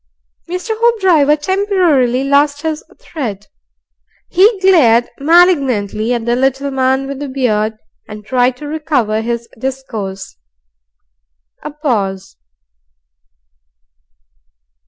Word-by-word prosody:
Mr. 365 +5 -4
Hoopdriver 380 -11 +3
temporarily 315 - +1
lost 285 +1 +1
his 315 -1 -3 0.2
thread. 215 - -6 0.8
He 395 +3 +3
glared 270 -12 +4
malignantly 275 - +2
at 230 -1 -4
the 240 0 +1
little 270 +2 0
man 265 0 0
with 275 -1 -6
the 290 -1 -5
beard, 220 -5 -1 0.3
and 210 -1 -10
tried 250 +1 +1
to 295 - -8
recover 285 -8 -1
his 235 0 -4
discourse. 225 - -6 1.2
A - - -6
pause. 215 - -3
270 Hz, 95 wpm, -15 LUFS, 235-315 Hz, 1.2 s, glared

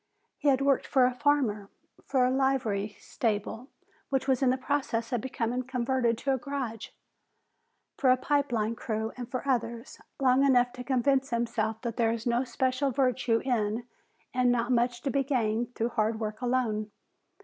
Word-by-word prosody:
He - - -1
had 270 -1 +4
worked 275 -1 +2
for 260 -2 +4
a 250 - +1
farmer, 250 -8 +1 0.4
for 260 -2 +3
a 250 - +2
livery 230 -7 0
stable 225 +2 -2 0.4
which 270 -1 0
was 265 -1 +2
in 265 - +4
the 255 - +2
process 260 -3 -2
of 240 - 0
becoming 250 0 -2
converted 250 -2 0
to 275 +3 0
a 260 - -1
garage, 245 -4 -4 1.1
for 265 - +3
a 255 - +6
pipe 285 +1 0
line 225 -1 0
crew 220 -1 -3
and 245 -1 -7
for 255 +2 -4
others, 235 -2 -2 0.2
long 260 0 +4
enough 250 -3 +4
to 250 0 -7
convince 270 +1 +1
himself 230 -2 -1
that 235 -1 -3
there 230 -2 +3
is 230 -1 -4
no 240 +1 +2
special 260 +2 0
virtue 250 -3 +1
in 230 -2 0 0.5
and 250 -1 +3
not 240 0 0
much 240 0 +1
to 275 - 0
be 275 +1 +1
gained 240 -3 -1
through 230 +1 0
hard 220 -1 0
work 215 0 -4
alone. 240 -4 0
245 Hz, 175 wpm, -29 LUFS, 230-265 Hz, 1.1 s, a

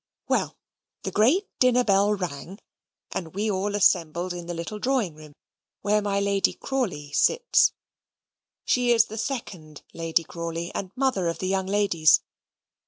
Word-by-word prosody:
Well, - - 0 0.5
the - - -3
great 285 - +3
dinner 250 -1 +4
bell 205 -1 +3
rang, 180 0 -6 0.5
and 170 -2 -5
we 210 +2 0
all 200 +1 -1
assembled 175 -2 +2
in 175 -1 -7
the 175 - -4
little 170 +6 -5
drawing 245 - 0
room 150 -1 -14 0.5
where 210 +1 +2
my 200 -1 0
Lady 200 -1 +1
Crawley 200 - -3
sits. 480 - +3 0.9
She 245 -1 +2
is 230 -1 +5
the 220 - -9
second 180 - -6
Lady 165 0 0
Crawley, 170 +1 -5
and 190 - -4
mother 255 -9 0
of 165 - -2
the 185 - -3
young 190 0 0
ladies. 190 -6 +4
195 Hz, 150 wpm, -25 LUFS, 170-215 Hz, 0.9 s, is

